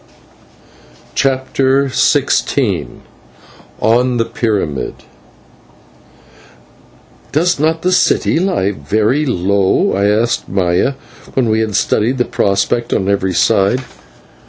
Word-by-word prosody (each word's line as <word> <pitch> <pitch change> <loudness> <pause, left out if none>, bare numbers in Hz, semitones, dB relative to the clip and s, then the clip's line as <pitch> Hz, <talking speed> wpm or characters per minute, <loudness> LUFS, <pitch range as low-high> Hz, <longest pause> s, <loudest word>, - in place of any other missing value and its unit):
CHAPTER 135 0 +1
XVI 130 - 0 0.8
ON 120 +2 +2
THE 115 - +1
PYRAMID 100 - -2 2.4
"Does 170 +2 +1
not 160 +2 0
the 185 - +1
city 180 -2 +2
lie 175 - 0
very 110 - 0
low?" 100 -3 +1
I 100 +1 +1
asked 110 +3 0
of - - -15
Maya, 90 +7 +1 0.4
when 125 -4 +1
we 110 0 +1
had 110 -2 -2
studied 120 +5 +1
the 125 - +1
prospect 100 +4 0
on 95 - 0
every 95 -2 0
side. 110 +6 +2
115 Hz, 105 wpm, -15 LUFS, 100-130 Hz, 2.4 s, ON